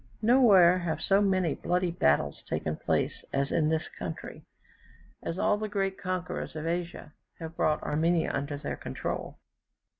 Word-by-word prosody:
Nowhere 205 Hz, -7 st, +6 dB
have 170 Hz, -3 st, -2 dB
so 195 Hz, +1 st, +3 dB
many 185 Hz, -5 st, +2 dB
bloody 180 Hz, 0 st, 0 dB
battles 75 Hz, -, +1 dB
taken -, -, -2 dB
place -, -, -1 dB
as 140 Hz, 0 st, 0 dB
in 155 Hz, -2 st, +2 dB
this 160 Hz, 0 st, 0 dB
country, -, -, -6 dB, 0.8 s
as 165 Hz, -, -4 dB
all 205 Hz, -, +2 dB
the 215 Hz, 0 st, -3 dB
great 195 Hz, -2 st, -1 dB
conquerors 185 Hz, -3 st, -4 dB
of 155 Hz, 0 st, -4 dB
Asia 170 Hz, -2 st, -4 dB, 0.2 s
have 165 Hz, 0 st, -8 dB
brought 155 Hz, -2 st, +1 dB
Armenia 160 Hz, +3 st, +1 dB
under 140 Hz, +1 st, -2 dB
their 145 Hz, -, -5 dB
control. -, -, -5 dB
175 Hz, 150 wpm, -29 LUFS, 155-190 Hz, 0.8 s, Nowhere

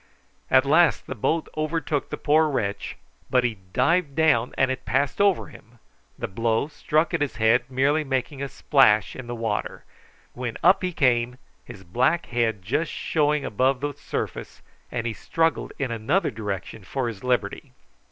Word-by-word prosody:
At 130 Hz, +1 st, +5 dB
last 160 Hz, +3 st, +4 dB
the -, -, -5 dB
boat 160 Hz, +7 st, -1 dB
overtook 155 Hz, -1 st, -2 dB
the -, -, -4 dB
poor 155 Hz, +1 st, +3 dB
wretch, 100 Hz, -8 st, -3 dB, 0.3 s
but 125 Hz, -1 st, +3 dB
he 115 Hz, -5 st, -2 dB
dived 145 Hz, -, +1 dB
down 150 Hz, -7 st, +3 dB
and 135 Hz, 0 st, +3 dB
it 130 Hz, -, -4 dB
passed 135 Hz, -, 0 dB
over 200 Hz, -3 st, +3 dB
him, 115 Hz, +3 st, -17 dB, 0.4 s
the -, -, -3 dB
blow 115 Hz, +7 st, 0 dB
struck 155 Hz, +2 st, 0 dB
at -, -, 0 dB
his 140 Hz, -6 st, -1 dB
head 120 Hz, +2 st, +2 dB
merely 140 Hz, +4 st, +2 dB
making 135 Hz, 0 st, -2 dB
a 140 Hz, -, -3 dB
splash 130 Hz, -9 st, +3 dB
in 130 Hz, -2 st, -8 dB
the 120 Hz, -, -4 dB
water, 115 Hz, -3 st, -3 dB, 0.5 s
when 120 Hz, -2 st, -4 dB
up 185 Hz, +3 st, +5 dB
he 185 Hz, -1 st, -1 dB
came, 125 Hz, -5 st, +1 dB, 0.3 s
his 95 Hz, -, -11 dB
black 130 Hz, -, +1 dB
head 115 Hz, -5 st, -1 dB
just 140 Hz, -, -1 dB
showing 150 Hz, -2 st, 0 dB
above 130 Hz, +5 st, +1 dB
the 145 Hz, 0 st, -2 dB
surface, -, -, -6 dB, 0.3 s
and 120 Hz, -1 st, -3 dB
he 115 Hz, -, -1 dB
struggled 165 Hz, +7 st, -1 dB
in 135 Hz, -3 st, -2 dB
another 115 Hz, -, 0 dB
direction 105 Hz, -1 st, -5 dB
for 130 Hz, +6 st, -2 dB
his 110 Hz, -4 st, -6 dB
liberty. 125 Hz, -5 st, -1 dB
130 Hz, 170 wpm, -24 LUFS, 115-150 Hz, 0.5 s, At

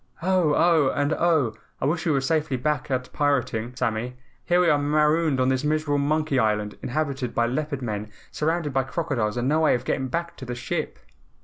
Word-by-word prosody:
"Oh! 180 Hz, -5 st, +2 dB
Oh! 160 Hz, -5 st, +4 dB
and 145 Hz, +2 st, +1 dB
OH! 160 Hz, -9 st, +2 dB, 0.3 s
I -, -, -1 dB
wish 165 Hz, +4 st, 0 dB
we -, -, +3 dB
were 140 Hz, -2 st, +2 dB
safely 150 Hz, -1 st, 0 dB
back 150 Hz, +4 st, -1 dB
at 130 Hz, -1 st, -2 dB
pirating, 125 Hz, -5 st, 0 dB
Sammy. 120 Hz, +1 st, -2 dB, 0.3 s
Here 175 Hz, 0 st, +2 dB
we 180 Hz, -, +3 dB
are 145 Hz, -3 st, +4 dB
marooned 150 Hz, 0 st, +2 dB
on 130 Hz, 0 st, +3 dB
this 130 Hz, 0 st, 0 dB
miserable 150 Hz, -1 st, +1 dB
monkey 150 Hz, -1 st, +1 dB
island, 105 Hz, -2 st, 0 dB
inhabited 135 Hz, -3 st, -2 dB
by 120 Hz, -, +3 dB
Leopard 140 Hz, +2 st, -2 dB
Men, 105 Hz, -2 st, -4 dB, 0.2 s
surrounded 155 Hz, -1 st, -1 dB
by 135 Hz, -, +3 dB
crocodiles 130 Hz, -7 st, -2 dB
and 120 Hz, +1 st, 0 dB
no 155 Hz, +3 st, +2 dB
way 160 Hz, -, +4 dB
of 125 Hz, +1 st, -5 dB
getting 130 Hz, 0 st, -1 dB
back 170 Hz, +6 st, -3 dB
to 130 Hz, -, -8 dB
the 120 Hz, -1 st, -4 dB
ship." 120 Hz, -, -3 dB
145 Hz, 200 wpm, -25 LUFS, 125-155 Hz, 0.3 s, Oh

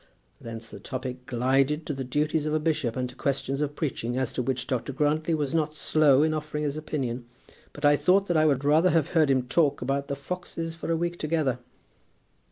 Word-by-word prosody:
Thence 115 Hz, -1 st, -7 dB
the -, -, -9 dB
topic 130 Hz, -1 st, -6 dB
glided 135 Hz, +4 st, +1 dB
to 150 Hz, -, -2 dB
the 135 Hz, -1 st, -4 dB
duties 150 Hz, +4 st, 0 dB
of 155 Hz, -, 0 dB
a -, -, +2 dB
bishop 150 Hz, -7 st, 0 dB
and 125 Hz, -1 st, -1 dB
to -, -, -11 dB
questions 135 Hz, 0 st, -2 dB
of 145 Hz, 0 st, -2 dB
preaching, 125 Hz, -5 st, -2 dB
as 130 Hz, -1 st, -1 dB
to -, -, -1 dB
which 125 Hz, -1 st, -2 dB
Dr. 130 Hz, +1 st, -2 dB
Grantly 155 Hz, +4 st, +1 dB
was 150 Hz, -1 st, -2 dB
not 155 Hz, -1 st, 0 dB
slow 150 Hz, -2 st, +4 dB
in 155 Hz, 0 st, +2 dB
offering 150 Hz, -1 st, -3 dB
his 145 Hz, -1 st, -1 dB
opinion. 130 Hz, -6 st, -3 dB, 0.5 s
But 145 Hz, -, -4 dB
I 145 Hz, 0 st, +6 dB
thought 195 Hz, +5 st, +3 dB
that 175 Hz, -, -1 dB
I 155 Hz, 0 st, +4 dB
would 140 Hz, -2 st, +1 dB
rather 155 Hz, +5 st, +5 dB
have 165 Hz, -4 st, +2 dB
heard 160 Hz, -5 st, +3 dB
him 130 Hz, -2 st, +3 dB
talk 145 Hz, +2 st, +2 dB
about 140 Hz, +3 st, -1 dB
the 140 Hz, -, -2 dB
foxes 165 Hz, +2 st, -5 dB
for 165 Hz, 0 st, -4 dB
a 165 Hz, -, +2 dB
week 175 Hz, +1 st, -2 dB
together." 155 Hz, -5 st, 0 dB
145 Hz, 215 wpm, -27 LUFS, 130-155 Hz, 0.5 s, I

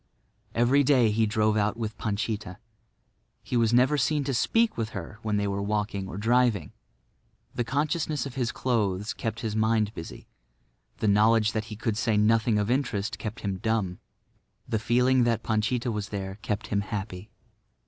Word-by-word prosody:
Every 125 Hz, +5 st, +4 dB
day 125 Hz, -5 st, +4 dB
he 110 Hz, +1 st, +2 dB
drove 110 Hz, 0 st, +2 dB
out 105 Hz, +1 st, +1 dB
with 110 Hz, -2 st, -4 dB
Panchita. 105 Hz, -3 st, -3 dB, 0.9 s
He -, -, -4 dB
was 115 Hz, -2 st, +3 dB
never 130 Hz, +5 st, +4 dB
seen 150 Hz, +2 st, +1 dB
to 135 Hz, 0 st, -2 dB
speak 225 Hz, -, +2 dB
to 115 Hz, -, -2 dB
her 105 Hz, 0 st, -8 dB
when 105 Hz, -1 st, -1 dB
they 100 Hz, 0 st, 0 dB
were 100 Hz, 0 st, -2 dB
walking 105 Hz, -1 st, -2 dB
or 95 Hz, -, -7 dB
driving. 115 Hz, -5 st, +2 dB, 0.8 s
The 120 Hz, -, -1 dB
consciousness 145 Hz, +3 st, -1 dB
of 135 Hz, -, -6 dB
his 125 Hz, -2 st, -1 dB
clothes 105 Hz, -5 st, -1 dB
kept 115 Hz, +1 st, -4 dB
his 110 Hz, -2 st, -3 dB
mind 110 Hz, -1 st, +1 dB
busy; 80 Hz, -, -9 dB, 0.7 s
the -, -, -1 dB
knowledge 110 Hz, +1 st, +4 dB
that 110 Hz, -1 st, -2 dB
he 110 Hz, -1 st, -8 dB
could 110 Hz, 0 st, -2 dB
say 110 Hz, -1 st, +1 dB
nothing 110 Hz, +1 st, +3 dB
of 105 Hz, +2 st, 0 dB
interest 120 Hz, -5 st, -1 dB
kept 110 Hz, +1 st, -6 dB
him 100 Hz, -2 st, -2 dB
dumb; 110 Hz, -5 st, -1 dB, 0.7 s
the 110 Hz, -, 0 dB
feeling 125 Hz, +3 st, +3 dB
that 115 Hz, -2 st, 0 dB
Panchita 115 Hz, +3 st, 0 dB
was 105 Hz, -1 st, -4 dB
there 95 Hz, 0 st, -5 dB
kept 105 Hz, 0 st, -3 dB
him 100 Hz, -1 st, +1 dB
happy. 100 Hz, -1 st, -5 dB
110 Hz, 170 wpm, -27 LUFS, 105-120 Hz, 0.9 s, Every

